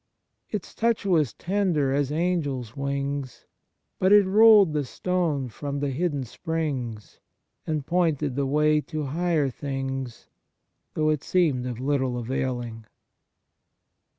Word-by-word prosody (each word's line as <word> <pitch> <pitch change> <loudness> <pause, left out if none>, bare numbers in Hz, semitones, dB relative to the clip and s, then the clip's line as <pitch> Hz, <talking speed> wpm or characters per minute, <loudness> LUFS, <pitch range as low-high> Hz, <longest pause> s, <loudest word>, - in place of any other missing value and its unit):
Its 210 -5 -5
touch 230 -2 0
was 155 - +2
tender 175 -8 0
as 140 0 0
angels' 150 -8 -1
wings. 140 -1 -3 0.5
But 190 +1 +3
it 205 -1 +7
rolled 205 -3 +6
the 150 -1 0
stone 160 -2 -1
from 140 +4 -5
the 140 -1 -1
hidden 145 -1 -1
springs. 130 - -4 0.5
And 155 -3 -2
pointed 155 -6 0
the 140 -1 0
way 150 +2 +3
to 155 0 -5
higher 155 -1 0
things. 135 -2 -5 0.7
Though 155 0 +2
it 150 -2 -2
seemed 150 -9 +1
of 120 -2 -5
little 130 -2 0
availing.' 120 -2 -3
145 Hz, 125 wpm, -25 LUFS, 130-170 Hz, 0.7 s, it